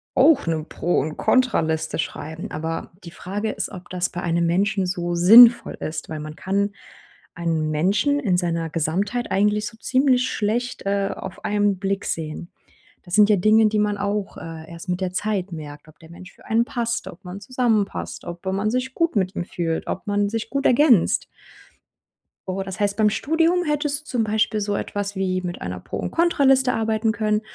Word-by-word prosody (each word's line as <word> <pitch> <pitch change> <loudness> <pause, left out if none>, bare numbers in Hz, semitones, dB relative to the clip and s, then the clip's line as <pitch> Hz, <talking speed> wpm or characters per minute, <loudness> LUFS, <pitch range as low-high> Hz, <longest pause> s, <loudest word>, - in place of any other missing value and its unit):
auch 315 - +5
'ne 160 -2 -1
Pro 175 - 0
und 155 +2 -3
Kontra-Liste 160 -11 +1
schreiben. 160 +3 -5
Aber 160 +2 -4
die 170 - -9
Frage 205 +4 -4
ist, - - -4
ob 185 -2 -10
das 180 -1 -1
bei 175 - -6
einem 170 0 +1
Menschen 195 +2 +1
so 175 -1 -2
sinnvoll 230 +7 +8
ist, 155 0 -6
weil 155 -1 -5
man 155 0 -8
kann 200 +2 -1 0.6
einen 165 -2 -1
Menschen 205 - +1
in 195 -10 +1
seiner 170 -2 -1
Gesamtheit 190 +10 -1
eigentlich 210 +2 +2
so 225 - -10
ziemlich 255 +1 +2
schlecht, 235 +2 -2
äh, 200 0 0
auf 190 0 -8
einen 205 -1 +1
Blick 195 0 -2
sehen. 160 +1 -4 0.5
Da 175 - -14
sind 210 +2 +5
ja 210 - +6
Dinge, 215 +3 +5
die 215 0 0
man 210 -1 +1
auch, 200 0 -3
äh, 160 -1 -9
erst 170 +2 -9
mit 180 +1 -1
der 185 -1 -2
Zeit 200 -2 -1
merkt, 150 -1 -9
ob 150 - -19
der 165 0 -15
Mensch 180 +1 -12
für - - -21
einen 230 +2 +2
passt, 235 -3 -2
ob 175 - -11
man 180 +2 -7
zusammenpasst, 225 -3 -1
ob 175 +1 -8
wenn 190 0 -1
man 210 +2 0
sich 255 +1 -2
gut 335 -4 0
mit 190 -1 0
ihm 175 - -3
fühlt, 165 -3 -3
ob 185 - -4
man 205 0 +1
sich 225 +1 -4
gut 275 0 -2
ergänzt. 250 - +4 1.2
Oh, 190 +1 -2
das 190 +1 -7
heißt, 205 0 0
beim 215 -1 +4
Studium 325 - +1
hättest 295 0 -1
zum 240 -4 0
Beispiel 215 0 0
so 205 0 -1
etwas 205 0 -3
wie 185 -1 -1
mit 175 -1 -6
einer 90 0 -5
Pro - - -6
und - - -4
Kontra-Liste 270 -6 +3
arbeiten 220 0 0
können. 215 0 0
200 Hz, 190 wpm, -22 LUFS, 175-225 Hz, 1.2 s, sinnvoll